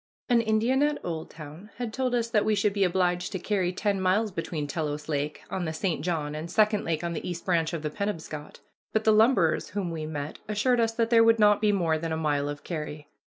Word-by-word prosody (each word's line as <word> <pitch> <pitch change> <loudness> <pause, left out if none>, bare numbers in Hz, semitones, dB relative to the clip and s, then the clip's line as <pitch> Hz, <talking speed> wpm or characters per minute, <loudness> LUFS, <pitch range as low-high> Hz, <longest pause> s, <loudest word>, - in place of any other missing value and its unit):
An 240 -1 +5
Indian 230 +4 +2
at 295 0 +2
Oldtown 160 +2 -7
had 235 -2 -4
told 255 -1 0
us 235 -1 0
that 220 -3 +2
we 215 0 +2
should 205 0 +1
be 200 -1 +2
obliged 180 -1 +1
to - - -1
carry 185 -1 0
ten 200 +1 -1
miles 200 +4 +2
between 165 -4 -3
Telos 150 -1 -3
Lake 150 -1 -2
on 185 -2 -2
the 160 - -3
St. 160 -2 -1
John 155 -4 -2
and 155 +2 -5
Second 210 +2 +2
Lake 160 0 -1
on 170 0 -2
the 165 - -4
East 175 -1 -6
Branch 165 -3 +1
of 165 -3 -4
the 150 - -2
Penobscot; 160 -6 -5 0.3
but 220 - +1
the 220 - +5
lumberers 215 -7 +3
whom 190 -4 -3
we 155 -2 -4
met 150 -1 -5
assured 225 +4 +1
us 225 -1 +2
that 230 0 0
there 230 -1 +7
would 230 0 +5
not 210 -1 +5
be 210 -1 +4
more 165 -5 +1
than 165 0 -3
a 160 - -1
mile 145 -2 0
of 145 0 -6
carry. 150 -3 -6
180 Hz, 235 wpm, -27 LUFS, 160-215 Hz, 0.3 s, there